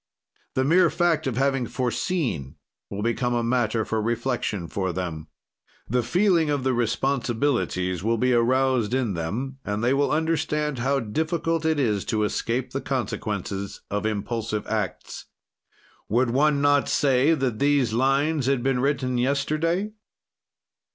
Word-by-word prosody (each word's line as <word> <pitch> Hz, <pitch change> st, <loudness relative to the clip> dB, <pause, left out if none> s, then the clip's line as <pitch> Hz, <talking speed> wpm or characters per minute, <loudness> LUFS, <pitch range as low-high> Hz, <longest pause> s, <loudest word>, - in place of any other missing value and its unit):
"The 130 Hz, -, +2 dB
mere 170 Hz, +5 st, +4 dB
fact 170 Hz, -4 st, +1 dB
of 125 Hz, -3 st, -2 dB
having 135 Hz, -2 st, +1 dB
foreseen 120 Hz, -, -2 dB, 0.3 s
will 100 Hz, +1 st, -4 dB
become 120 Hz, +1 st, 0 dB
a 120 Hz, -, 0 dB
matter 115 Hz, -2 st, +1 dB
for 110 Hz, -1 st, -1 dB
reflection 115 Hz, -5 st, -2 dB
for 95 Hz, +1 st, -2 dB
them. 85 Hz, -4 st, -4 dB, 0.6 s
"The 125 Hz, +2 st, +1 dB
feeling 170 Hz, -, +2 dB
of 145 Hz, -3 st, 0 dB
the 130 Hz, 0 st, +1 dB
responsibilities 120 Hz, -, 0 dB
will 115 Hz, +2 st, +1 dB
be 125 Hz, +2 st, +2 dB
roused 125 Hz, -1 st, +2 dB
in 125 Hz, -6 st, 0 dB
them, 115 Hz, +12 st, -4 dB
and 105 Hz, +2 st, -3 dB
they 125 Hz, +2 st, +3 dB
will 140 Hz, +1 st, +2 dB
understand 150 Hz, -3 st, 0 dB
how 135 Hz, +2 st, +1 dB
difficult 160 Hz, +7 st, -1 dB
it 160 Hz, -2 st, +2 dB
is 105 Hz, -7 st, +1 dB
to 110 Hz, -2 st, 0 dB
escape 120 Hz, +4 st, -1 dB
the 135 Hz, -, -3 dB
consequences 105 Hz, -6 st, -3 dB
of 105 Hz, +1 st, -1 dB
impulsive 110 Hz, 0 st, -3 dB
acts." 105 Hz, -5 st, -4 dB, 0.8 s
Would 120 Hz, +2 st, +2 dB
one 145 Hz, +2 st, +3 dB
not 145 Hz, -1 st, +3 dB
say 140 Hz, +2 st, +3 dB
that 130 Hz, -6 st, -2 dB
these 140 Hz, -5 st, +2 dB
lines 135 Hz, +3 st, +1 dB
had 135 Hz, -3 st, +1 dB
been 135 Hz, -1 st, +1 dB
written 130 Hz, -2 st, 0 dB
yesterday? 155 Hz, -, 0 dB
125 Hz, 145 wpm, -25 LUFS, 110-145 Hz, 0.8 s, mere